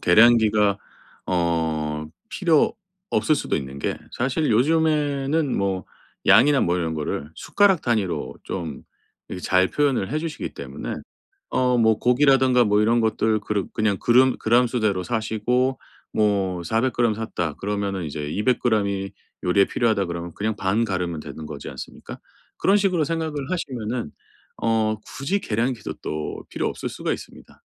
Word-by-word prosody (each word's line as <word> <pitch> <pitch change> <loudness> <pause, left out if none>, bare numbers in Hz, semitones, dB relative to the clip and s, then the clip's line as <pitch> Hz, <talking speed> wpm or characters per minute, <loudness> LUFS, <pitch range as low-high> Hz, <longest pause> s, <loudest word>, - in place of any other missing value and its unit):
계량기가 105 0 +5 0.5
어 80 -3 0 0.2
필요 170 -2 +2 0.4
없을 155 - +2
수도 - - -1
있는 70 -1 -6
게 - - -2 0.2
사실 135 +4 0
요즘에는 150 +1 +2
뭐 95 -1 -1 0.4
양이나 140 +3 +6
뭐 85 +1 +1
이런 80 -2 -2
거를 75 -1 -3
숟가락 190 +4 +2
단위로 110 -7 -1
좀 80 -7 -5 0.5
이렇게 90 - -6
잘 95 0 +3
표현을 135 -7 0
해 155 - 0
주시기 160 -1 -4
때문에 - - -6 0.6
어 125 -1 +2
뭐 110 -2 +3
고기라든가 130 -1 +4
뭐 105 -1 +3
이런 115 +2 +3
것들 110 -1 +1
그르 105 -2 -2
그냥 110 -3 +1
그름 130 +2 +4
그램 120 +2 +3
수대로 110 -6 0
사시고 120 +4 0 0.3
뭐 100 -4 +1
400g 115 +4 +1
샀다 90 -8 -3
그러면은 100 -1 -3
이제 75 -1 -5
200g 110 +2 +1
이 100 -1 -3 0.3
요리에 95 +2 +4
필요하다 110 -4 +1
그러면 85 0 -5
그냥 110 +1 -1
반 105 +3 +1
가르면 90 -5 -2
되는 75 +1 -8
거지 75 -2 -7
않습니까? - - -9 0.4
그런 195 - +4
식으로 190 -5 +2
생각을 160 0 -2 0.2
하시면은 125 - -3 0.5
어 110 -1 +2
굳이 190 +10 -2
계량기도 115 - -2
또 75 0 -5
필요 - - -2
없을 - - -5
수가 - - -3
있습니다. - - -10
110 Hz, 305 characters per minute, -23 LUFS, 95-130 Hz, 0.6 s, 양이나